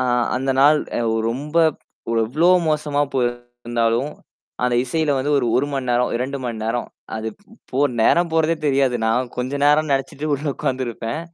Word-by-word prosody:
ஆ - - +2 0.3
அந்த 135 +1 -1
நாள் 150 +2 +6 0.2
அ - - 0 0.3
ரொம்ப 150 +6 -5 0.5
ப் - - 0
எவ்ளோ 150 +10 +1 0.2
மோசமா 150 -1 0
போயிருந்தாலும், 120 0 -1 0.5
அந்த 125 -1 +2
இசையில 155 +3 0
வந்து 140 +3 -1
ஒரு 120 - 0
1 140 +3 +2
மணி 135 -2 -3
நேரம், 120 +1 +2
2 135 +3 -3
மணி 115 -2 -3
நேரம். 115 +2 -1 0.3
அது 110 0 -3
ப் 205 - -27 0.3
போ 130 - -1 0.2
நேரம் 170 +9 +3
போறதே 160 0 +2
தெரியாது. 135 -3 +2
நான் 120 +2 0
கொஞ்ச 130 +3 -2
நேரம் 150 +1 +3
நெச்சுட்டு 135 +2 -2
உள்ள 145 +2 -5
உட்கார்ந்துருப்பேன். 120 +1 -3
130 Hz, 165 wpm, -21 LUFS, 120-150 Hz, 0.5 s, நாள்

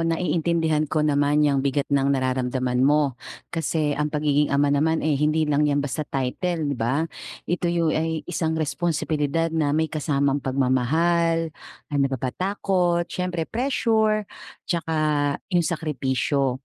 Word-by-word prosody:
naiintindihan 165 -2 0
ko 155 +1 +1
naman 145 0 +2
yang 140 -2 +2
bigat 140 +1 0
ng 140 -1 +3
nararamdaman 130 -1 -1
mo, 145 +1 +3 0.4
kasi 155 -2 0
ang 150 +1 -1
pagiging 150 -1 +1
ama 140 0 +2
naman, 160 +2 +1
eh, 155 - +2
hindi 155 +1 +2
lang 150 0 +2
'yan 145 0 +1
basta 145 +2 -3
title, 150 +3 -2
di - - -4
ba? 125 +7 0 0.4
Ito 175 0 -1
yung 170 -2 +1
ay 160 0 -1
isang 160 -2 -2
responsibilidad 160 0 -1
na 150 -2 +1
may 160 0 0
kasamang 140 -2 0
pagmamahal, 160 +6 +1 0.4
ano 140 -1 +2
pa 135 - -2
ba? 130 +1 -3
Takot, 180 -3 0
siyempre, 180 -2 -3
pressure, 220 - +1 0.4
'tsaka 165 -2 -2 0.6
yung 175 -1 +3
sakripisyo. 135 -4 -1
150 Hz, 140 wpm, -24 LUFS, 140-165 Hz, 0.6 s, ng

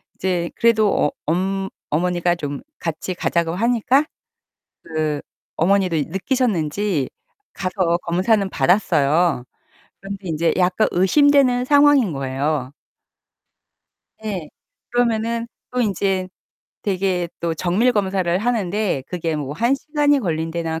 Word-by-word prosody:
이제 180 -2 -1
그래도 225 -2 +3
어 150 - +2
엄 190 +4 -1 0.2
어머니가 175 +2 +1
좀 145 -3 -5 0.2
같이 170 +3 -3
가자고 170 -1 0
하니까. 245 +6 +2 0.8
그 155 -2 -2 0.4
어머니도 185 0 +2
느끼셨는지 190 - 0 0.5
가서 185 -2 0
검사는 190 +3 +1
받았어요. 170 -6 +2 0.6
그런데 195 0 -6
인제 165 0 +1
약간 180 +4 +2
의심되는 255 +5 +4
상황인 285 - +5
거예요. 135 0 -2 1.5
예. 185 -8 -4 0.4
그러면은 235 -1 0 0.2
또 250 - -2
인제 195 -4 0 0.6
되게 185 -3 0
또 170 -1 -1
정밀 185 +10 +2
검사를 190 -4 0
하는데 210 - 0
그게 165 -3 -2
뭐 145 -1 -4
1 235 - +2
시간이 290 0 +1
걸린다나 165 -3 -2
185 Hz, 245 characters per minute, -21 LUFS, 165-220 Hz, 1.5 s, 상황인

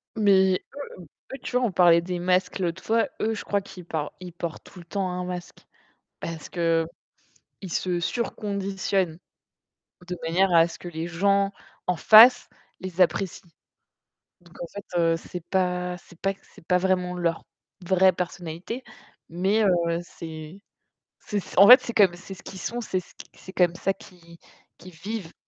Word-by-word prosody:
Mais, 190 -3 +4 0.4
eux - - -10 0.3
eux 270 - -4
tu - - -5
vois 250 0 +3
on 210 - 0
parlais 170 -1 +5
des 180 0 -4
masques 185 +2 +1
l'autre 180 0 -2
fois. 225 +1 +2
Eux, 220 +1 +1
je - - -6
crois 200 -1 0
qu'ils 190 -2 -12
parlent 155 -3 -3
ils 180 -2 -9
portent 170 -1 -6
tout 180 - -14
le 175 - -12
temps 190 +2 -2
un 180 0 -3
masque. 180 -1 -6 0.6
Parce 165 -1 -6
qu'ils 165 -1 +1 0.8
se 180 0 -1
sur-conditionnent, 195 -4 -2 0.9
de 180 - -3
manière 175 +3 +2
à 165 0 +6
ce 165 - -11
que - - -9
les 165 -1 -4
gens 195 +3 +2 0.4
en 180 -1 +1
face 230 - +8 0.3
les 185 0 -3
apprécient. 180 -1 0 0.9
Donc 170 -1 -20
en 175 - -3
fait, 200 +2 -9
heu, 165 0 +3
c'est 175 0 -9
pas 180 -1 0
c'est 175 -1 -19
pas 195 0 0
que 195 - -26
c'est - - -19
pas 180 - +3
vraiment 180 -1 0
leur 170 -2 -1 0.4
vraie 190 +1 +5
personnalité, 180 +6 -5 0.5
mais 190 +6 +1
heu, 170 -3 +2
c'est 160 +1 -9 0.6
c'est 205 -1 -3 0.2
en 200 - +9
fait, 250 +2 +11
c'est 235 - -6
comme 195 -5 +5
c'est 190 +2 -10
ce 185 - -15
qu'ils 190 - -9
sont, 240 +7 -3
c'est 190 -5 -2
ce 180 - -19
qu - - -12
c'est 190 - -12
comme 175 -2 +2
ça 195 - 0
qu'ils 175 -5 -16 0.4
qu'ils 185 - -13
vivent. 190 +1 -6
180 Hz, 175 wpm, -25 LUFS, 170-195 Hz, 0.9 s, fait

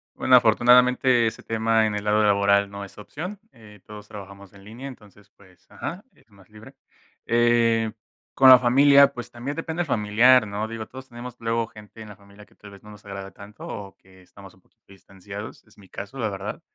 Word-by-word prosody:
Bueno, 130 - +3
afortunadamente 125 +1 +4
ese 110 - -6
tema 115 0 +1
en 105 - -2
el 105 - -4
lado 105 +1 +1
laboral 100 0 +2
no 100 0 -8
es 100 - -13
opción. 175 - -8
Eh, 105 -3 -17
todos 105 0 -12
trabajamos 100 -1 -12
en 100 -1 -17
línea, 120 +6 -10
entonces, 105 -5 -15
pues 90 -2 -23
ajá, 180 +4 -7
es - - -29
más 100 -2 -22
libre. 110 +1 -15 0.5
Eh. 115 -1 +2 0.4
Con 130 -1 +6
la 130 - +10
familia, 140 +3 +5
pues, 120 -1 -9
también 125 +5 -7
depende 165 +1 -4
el - - -2
familiar, 115 0 +3
¿no? 105 +2 -4
Digo, 115 -1 -6
todos 130 +1 -12
tenemos 120 0 -10
luego 115 0 -2
gente 105 +1 -16
en 110 - -10
la 105 - -12
familia 100 +1 -18
que - - -28
tal 105 - -15
vez 100 - -15
no 105 - -14
nos 105 -1 -15
agrada 100 -1 -9
tanto 105 +1 -13
o 100 -1 -9
que 95 0 -22
estamos 95 +1 -16
un 95 - -26
poquito - - -39
distanciados, 100 +2 -11
es 110 - -25
mi 100 -2 -18
caso 105 +7 -9
la 110 -3 -1
verdad. 95 - -7
110 Hz, 210 wpm, -23 LUFS, 100-120 Hz, 0.5 s, la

